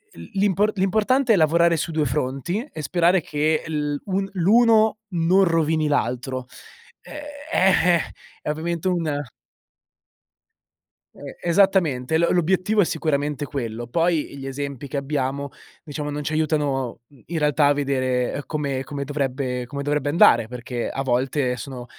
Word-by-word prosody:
l - - -11
l'impo 200 0 +2
l'importante 220 +6 +2
è - - +5
lavorare 170 0 +4
su 165 +1 -2
due 155 -1 0
fronti 135 - -2
e 155 - -6
sperare 175 +6 +3
che 155 +1 0
l 150 -2 -2
un 195 0 -1
l'uno 220 +4 +4
non 175 +3 +3
rovini 160 -3 +1
l'altro, 130 -1 -1 0.6
ehm, - - -12 0.4
eh-eh, 180 - +4 0.4
è - - -4
ovviamente 165 +3 -2
un 170 -4 0 2.0
Ehm, - - -9
esattamente, 170 -7 +2
lo 170 +1 +2
l'obiettivo 185 +4 +2
è - - +3
sicuramente 145 -3 -1
quello, 120 -5 -4
poi 165 +4 0
gli 135 -1 -7
esempi 140 0 -5
che 140 - -4
abbiamo, 140 0 -2 0.3
diciamo 150 -1 -5
non 150 0 -4
ci 155 - -3
aiutano, 145 -6 -1
uhm, 140 -4 -21
in 170 - -3
realtà 150 -1 +3
a 145 - +4
vedere, 130 -3 0
ehm, - - -3
come 140 -4 -2
come 145 0 -5
dovrebbe 135 -3 -2
come 140 +3 -5
dovrebbe 145 0 0
andare 145 -7 +5
perché 125 0 -5
a 135 - -3
volte 130 0 0
sono 125 0 -7
150 Hz, 145 wpm, -23 LUFS, 135-170 Hz, 2.0 s, è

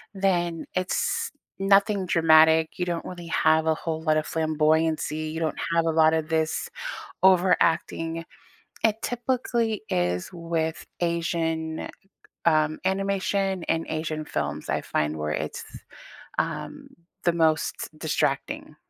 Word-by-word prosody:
then 175 -4 0
it's 185 0 0 0.3
nothing 195 0 +3
dramatic. 160 -1 +5
You 180 - +1
don't 170 -1 -3
really 175 -2 -8
have 160 -1 +3
a 160 - +3
whole 160 0 -4
lot 155 -1 +2
of 155 - 0
flamboyancy. 155 0 +1
You 160 - -4
don't 160 - -1 0.2
have 165 0 +3
a 165 - +2
lot 160 0 +5
of 160 -1 -1
this 160 0 0 0.5
overacting 170 -3 +3 0.6
It 220 0 +2
typically 240 -3 -1
is 90 0 0
with 165 -2 -2 0.2
Asian, 165 -2 -1 0.6
um, 155 -1 +3
animation 195 -1 0
and 165 0 -1
Asian 155 -1 -3
films, - - -3
I - - 0
find 75 +1 -1
where 75 0 -2
it's, - - -4 0.8
um, - - -4 0.4
the 175 - +4
most 160 -2 +1
distracting. 140 -3 -1
165 Hz, 125 wpm, -26 LUFS, 155-180 Hz, 0.8 s, dramatic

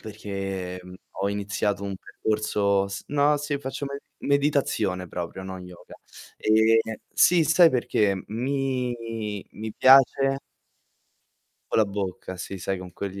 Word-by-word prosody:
perché, 95 -4 -5
mhmm, 90 0 -11 0.3
ho 100 - +1
iniziato 100 -1 -1
un 100 -1 -3
percorso 100 -1 0
s 100 0 -6
no, 145 +1 +3
sì, 145 -1 -2
faccio 140 +1 -5
med 140 0 -5 0.2
meditazione 135 - 0
proprio, 90 +2 -5
non 95 -1 -7
yoga. 90 -1 -13 0.4
Ehm 110 0 +3 0.2
sì, 170 0 +5
sai 165 +1 +6
perché? 105 -6 +1
Mi 130 +1 -1 0.6
mi 110 0 -6
piace 135 +1 +6 1.3
Co' - - +1
la 110 - +5
bocca, 95 -2 -5
sì, 95 - -5
sai, 95 +1 -3
con 90 -1 -10
quegli 100 0 -5
105 Hz, 130 wpm, -25 LUFS, 95-135 Hz, 1.3 s, sai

